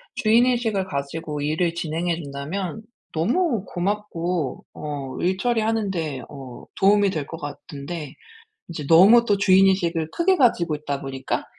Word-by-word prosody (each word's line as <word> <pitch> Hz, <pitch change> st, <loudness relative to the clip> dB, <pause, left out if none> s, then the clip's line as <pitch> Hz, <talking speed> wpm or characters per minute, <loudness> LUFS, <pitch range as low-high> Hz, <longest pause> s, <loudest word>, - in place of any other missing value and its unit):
주인의식을 230 Hz, -3 st, +2 dB
가지고 150 Hz, -1 st, -4 dB
일을 160 Hz, +4 st, 0 dB
진행해 170 Hz, 0 st, -1 dB
준다면 155 Hz, +9 st, -5 dB, 0.3 s
너무 235 Hz, -, +1 dB
고맙고 180 Hz, -6 st, -2 dB
어 140 Hz, -3 st, -6 dB
일 185 Hz, +2 st, +1 dB
처리하는데 205 Hz, -, -1 dB
어 135 Hz, -4 st, -10 dB
도움이 200 Hz, 0 st, +4 dB
될 155 Hz, -5 st, -4 dB
것 165 Hz, -, -7 dB
같은데 145 Hz, +1 st, -7 dB, 0.5 s
이제 160 Hz, -4 st, -6 dB
너무 200 Hz, +9 st, +7 dB
또 205 Hz, -3 st, +2 dB
주인 195 Hz, -1 st, +5 dB
의식을 170 Hz, -4 st, +1 dB
크게 370 Hz, -, +2 dB
가지고 180 Hz, -, +2 dB
있다 145 Hz, -2 st, -4 dB
보니까 135 Hz, -1 st, -3 dB
175 Hz, 295 characters per minute, -23 LUFS, 150-205 Hz, 0.5 s, 너무